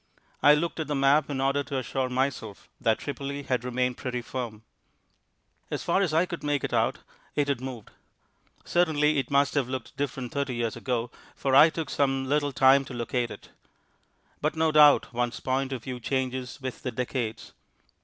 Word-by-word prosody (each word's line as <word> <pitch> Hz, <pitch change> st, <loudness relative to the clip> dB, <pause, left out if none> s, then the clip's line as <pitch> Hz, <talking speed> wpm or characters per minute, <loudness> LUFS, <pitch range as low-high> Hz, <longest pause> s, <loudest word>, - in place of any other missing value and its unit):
I 145 Hz, -, +7 dB
looked 165 Hz, +2 st, -2 dB
at 155 Hz, -, -2 dB
the 150 Hz, -, -1 dB
map 140 Hz, +2 st, +3 dB
in 140 Hz, -2 st, -2 dB
order 135 Hz, +1 st, +1 dB
to 135 Hz, 0 st, -4 dB
assure 130 Hz, +1 st, -2 dB
myself 125 Hz, -5 st, -2 dB
that 110 Hz, -1 st, +2 dB
Tripoli 140 Hz, 0 st, -5 dB
had 125 Hz, -3 st, -1 dB
remained 125 Hz, 0 st, -1 dB
pretty 125 Hz, -2 st, -4 dB
firm. 115 Hz, -4 st, -5 dB, 1.1 s
As -, -, -3 dB
far 190 Hz, -, +2 dB
as 185 Hz, -5 st, +1 dB
I 160 Hz, +3 st, +3 dB
could 170 Hz, -2 st, -6 dB
make 145 Hz, -2 st, 0 dB
it -, -, -3 dB
out -, -, +1 dB, 0.3 s
it 145 Hz, -1 st, +1 dB
had 135 Hz, -3 st, 0 dB
moved. 130 Hz, -5 st, -7 dB, 0.7 s
Certainly 155 Hz, -4 st, +2 dB
it 130 Hz, -, -3 dB
must 140 Hz, 0 st, +3 dB
have 135 Hz, -4 st, 0 dB
looked 130 Hz, -3 st, -5 dB
different 135 Hz, -3 st, -3 dB
thirty 140 Hz, -3 st, -2 dB
years 115 Hz, -2 st, -2 dB
ago, 120 Hz, -1 st, -2 dB, 0.2 s
for 135 Hz, -1 st, 0 dB
I 155 Hz, +4 st, +9 dB
took 160 Hz, -2 st, -5 dB
some 135 Hz, -1 st, +1 dB
little 145 Hz, +1 st, +1 dB
time 135 Hz, +1 st, +5 dB
to 130 Hz, -, -8 dB
locate 120 Hz, 0 st, -1 dB
it. -, -, -11 dB, 0.9 s
But 150 Hz, +2 st, 0 dB
no 160 Hz, 0 st, +2 dB
doubt 150 Hz, -4 st, +6 dB
one's 120 Hz, 0 st, -1 dB
point 130 Hz, +1 st, -1 dB
of 125 Hz, -4 st, -4 dB
view 125 Hz, -1 st, -5 dB
changes 130 Hz, 0 st, -3 dB
with 130 Hz, -2 st, -6 dB
the 125 Hz, -, -3 dB
decades. 115 Hz, -2 st, -4 dB
135 Hz, 185 wpm, -27 LUFS, 125-145 Hz, 1.1 s, I